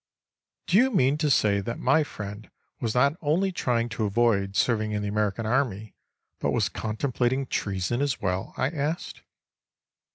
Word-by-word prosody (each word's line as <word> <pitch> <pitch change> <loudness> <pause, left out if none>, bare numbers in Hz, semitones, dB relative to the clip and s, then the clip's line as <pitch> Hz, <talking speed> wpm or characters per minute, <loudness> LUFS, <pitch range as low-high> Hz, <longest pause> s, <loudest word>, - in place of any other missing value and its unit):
"Do 180 - +3
you 255 +4 +5
mean 145 - +2
to 150 -1 +1
say 105 -6 +3
that 115 +4 -4
my 160 -1 +3
friend 105 -5 -8 0.3
was 115 -1 -2
not 140 +4 +3
only 170 +6 +1
trying 120 -9 0
to 110 0 -2
avoid 100 -2 +1
serving 110 -2 +1
in 105 0 -1
the - - -2
American 105 +1 -1
Army 110 -4 -1 0.5
but - - 0
was - - +1
contemplating 125 +3 -1
treason 100 +2 -2
as 140 -4 0
well?" 95 -2 -2
I 130 - 0
asked. 155 +1 -3
120 Hz, 160 wpm, -26 LUFS, 105-140 Hz, 0.5 s, you